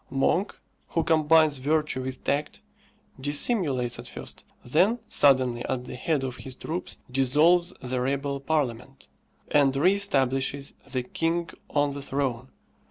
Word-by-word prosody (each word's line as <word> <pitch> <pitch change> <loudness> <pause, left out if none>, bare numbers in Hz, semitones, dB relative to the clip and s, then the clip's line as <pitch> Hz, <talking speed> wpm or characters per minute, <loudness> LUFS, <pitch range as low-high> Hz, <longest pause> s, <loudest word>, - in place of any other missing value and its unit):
Monk, 140 +8 0 0.3
who 165 - 0
combines 155 -2 +4
virtue 150 0 0
with 130 0 -6
tact, 145 +2 -1 0.6
dissimulates 145 - 0
at - - -6
first, - - -9 0.2
then 180 - +3
suddenly 130 -4 +3
at 125 - -2
the - - -8
head 140 +2 -1
of 130 -2 -4
his 130 -1 -8
troops 165 +6 -5
dissolves 150 +7 +3
the 125 0 -2
rebel 140 +2 -1
parliament, 125 - -2 0.4
and 140 -2 +4
re 175 +8 +4
establishes 135 -7 0 0.2
the 130 -2 -1
king 165 +5 -1 0.2
on 145 -1 +1
the 140 0 -6
throne. 130 -3 -2
140 Hz, 135 wpm, -26 LUFS, 130-160 Hz, 0.6 s, combines